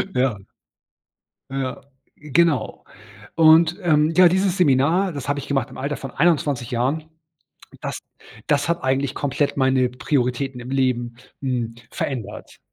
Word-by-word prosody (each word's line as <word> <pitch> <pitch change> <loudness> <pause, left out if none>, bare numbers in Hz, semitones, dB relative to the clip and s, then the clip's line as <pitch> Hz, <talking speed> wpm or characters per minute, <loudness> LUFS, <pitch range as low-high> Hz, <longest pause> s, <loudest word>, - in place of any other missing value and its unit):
Ja. 125 -4 +1 1.1
Ja, 135 -1 -4 0.3
genau. 150 0 0 0.5
Und, 160 +1 +5
ähm, 155 -1 +3
ja, 185 -1 +8
dieses 190 +1 +1
Seminar, 165 +4 +3
das 140 -1 -6
habe 145 0 0
ich 140 - -8
gemacht 135 -4 -1
im - - -12
Alter 145 +2 -3
von 135 - -7
21 145 -6 +1
Jahren. 140 +6 -1 0.7
Das - - -4 0.5
das 145 0 +1
hat 170 0 -1
eigentlich 135 +1 0
komplett 145 +1 -1
meine 130 -1 +2
Prioritäten 125 0 -1
im 125 +1 -8
Leben, 125 -3 0 0.2
hm, 120 -4 -2 0.2
verändert. 110 -6 -5
140 Hz, 130 wpm, -22 LUFS, 130-155 Hz, 1.1 s, ja